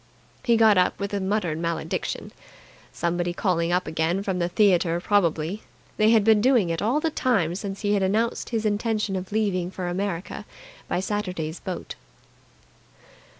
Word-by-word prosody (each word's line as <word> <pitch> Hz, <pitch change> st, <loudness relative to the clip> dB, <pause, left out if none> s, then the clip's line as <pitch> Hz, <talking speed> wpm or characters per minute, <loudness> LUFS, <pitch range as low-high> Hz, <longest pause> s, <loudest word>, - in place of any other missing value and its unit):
He 235 Hz, -2 st, +3 dB
got 220 Hz, -4 st, +6 dB
up 180 Hz, -, +1 dB
with 200 Hz, 0 st, -4 dB
a 200 Hz, -, 0 dB
muttered 190 Hz, -5 st, -1 dB
malediction. 170 Hz, 0 st, -3 dB, 0.6 s
Someone 175 Hz, +1 st, -1 dB
calling 175 Hz, -4 st, 0 dB
up 180 Hz, +1 st, +1 dB
again 160 Hz, +4 st, -1 dB
from 190 Hz, -2 st, -2 dB
the 175 Hz, 0 st, 0 dB
theatre 175 Hz, -3 st, +3 dB
probably. 175 Hz, 0 st, +1 dB, 0.4 s
They 215 Hz, 0 st, +4 dB
had 225 Hz, -2 st, +5 dB
been 220 Hz, -1 st, +5 dB
doing 235 Hz, -8 st, +3 dB
it 165 Hz, -, -2 dB
all 240 Hz, +8 st, +2 dB
the 320 Hz, 0 st, -1 dB
time 200 Hz, -, +1 dB
since 195 Hz, +1 st, -5 dB
he 205 Hz, -1 st, +1 dB
had 200 Hz, -, +2 dB
announced 215 Hz, +5 st, 0 dB
his 225 Hz, -2 st, -2 dB
intention 210 Hz, -1 st, 0 dB
of 185 Hz, +1 st, -5 dB
leaving 200 Hz, -5 st, 0 dB
for 185 Hz, -1 st, -5 dB
America 185 Hz, +2 st, -3 dB, 0.4 s
by 180 Hz, -, -1 dB
Saturday's 180 Hz, -6 st, -3 dB
boat. 185 Hz, -2 st, -6 dB
195 Hz, 160 wpm, -25 LUFS, 175-215 Hz, 0.6 s, got